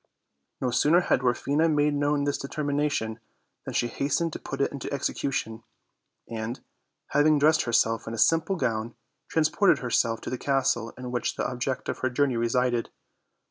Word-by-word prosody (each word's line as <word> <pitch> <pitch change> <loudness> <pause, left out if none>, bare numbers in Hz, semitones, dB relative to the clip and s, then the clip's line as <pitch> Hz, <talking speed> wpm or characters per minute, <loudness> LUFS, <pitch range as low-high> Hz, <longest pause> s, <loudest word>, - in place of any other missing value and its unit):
No 125 - -1
sooner 150 +7 +4
had 175 - +2
Dwarfina 140 +5 +1
made 150 -1 +2
known 145 0 +1
this 145 0 -1
determination 140 -6 -2 0.5
than - - -6
she 120 - +2
hastened 145 +6 -1
to - - -5
put 135 - -6
it 140 - +1
into 140 - -6
execution; 130 -4 -2 0.7
and, 115 +1 -4 0.5
having 150 +1 +4
dressed 155 +2 +3
herself 115 -1 +1
in 115 - -4
a - - -8
simple 165 - +3
gown, 115 -6 -2 0.3
transported 160 +5 +3
herself 115 -2 0
to - - -6
the 130 - -3
castle 130 -4 0
in 125 -1 -6
which 120 -2 -1
the - - -1
ob 125 -1 -6
ject 130 0 -2
of - - -3
her 130 - 0
journey 130 0 +1
resided. 120 +1 0
135 Hz, 170 wpm, -27 LUFS, 120-145 Hz, 0.7 s, sooner